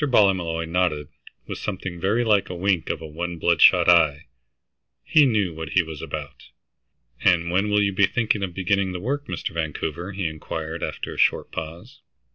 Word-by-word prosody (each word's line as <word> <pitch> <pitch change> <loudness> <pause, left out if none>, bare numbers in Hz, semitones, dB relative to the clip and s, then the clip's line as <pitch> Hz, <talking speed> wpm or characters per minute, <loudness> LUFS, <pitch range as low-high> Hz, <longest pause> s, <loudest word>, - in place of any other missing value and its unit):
Ballymolloy 95 - +2
nodded 80 -4 0 0.4
with - - -6
something 95 -3 -5
very 105 +7 +1
like 105 -4 +2
a 90 - -5
wink 90 -1 0
of - - -3
one 85 +2 -5
bloodshot 85 +1 +5
eye. 80 -5 +4 0.8
He 150 -3 +5
knew 105 -8 +1
what 80 +1 -7
he 90 - +4
was 80 -2 -8
about. - - -7 0.8
"And 85 -1 +3
when 100 +4 +1
will 105 0 +3
you 100 -1 0
be 100 +1 +4
thinking 110 -1 0
of 90 -3 -4
beginning 95 0 0
the 90 - -4
work, 140 +8 -3
Mr. - - -4
Vancouver?" 80 +3 -3
he 95 -1 -3
inquired, 80 +1 -5
after - - -4
a - - -11
short - - +2
pause. 85 - -8
90 Hz, 175 wpm, -23 LUFS, 80-100 Hz, 0.8 s, bloodshot